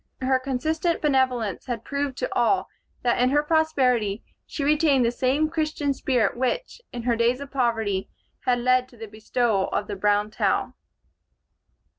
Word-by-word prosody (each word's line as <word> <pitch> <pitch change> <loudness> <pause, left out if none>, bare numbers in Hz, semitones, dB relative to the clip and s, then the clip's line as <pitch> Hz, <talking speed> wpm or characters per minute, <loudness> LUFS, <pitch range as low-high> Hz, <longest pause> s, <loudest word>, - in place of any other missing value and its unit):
Her 260 0 +2
consistent 310 +6 -1
benevolence 260 -8 0
had 235 -3 -4
proved 280 -1 -3
to 255 - -3
all 245 +11 +2 0.4
that 240 0 +2
in 250 - +4
her 290 +2 +2
prosperity 260 -10 +1 0.2
she 290 - -4
retained 290 -3 +3
the 230 - +2
same 265 +5 +1
Christian 310 -3 -1
spirit 255 -6 0
which, 370 - -2
in 240 -1 -6
her 240 -1 +1
days 235 +2 +1
of 280 -1 -8
poverty, 225 -7 0 0.4
had 250 -1 +3
led 255 +1 +2
to 245 - -18
the 225 - -7
bestowal 215 -1 0
of 205 - -1
the 205 - -5
brown 205 +1 +1
towel. - - 0
255 Hz, 160 wpm, -24 LUFS, 230-285 Hz, 0.4 s, in